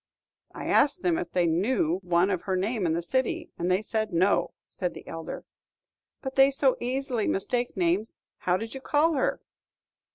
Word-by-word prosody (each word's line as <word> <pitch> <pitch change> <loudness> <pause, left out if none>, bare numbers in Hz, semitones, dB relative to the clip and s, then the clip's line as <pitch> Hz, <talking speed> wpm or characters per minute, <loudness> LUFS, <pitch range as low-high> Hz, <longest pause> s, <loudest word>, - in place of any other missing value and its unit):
"I - - -6
asked 295 +5 +3
them 340 -2 +2
if - - -4
they 175 -1 +2
knew 175 0 +1
one 180 +1 +2
of 185 -3 -1
her 190 - -1
name 200 +1 0
in 160 - +1
the 170 +1 -1
city, 260 +8 -1
and 175 +1 0
they 185 +3 +2
said, 220 0 -2
'No,'" 180 +4 +2
said 180 -2 -4
the - - -11
elder. 165 0 -6 0.8
"But 265 -1 -4
they 270 0 +6
so 275 -1 +2
easily 255 -2 -1
mistake 240 +4 -1
names: 180 +5 0 0.2
how 180 0 +1
did 225 +3 -6
you 270 - -7
call 305 +4 +2
her?" 270 - 0
210 Hz, 185 wpm, -27 LUFS, 180-265 Hz, 0.8 s, they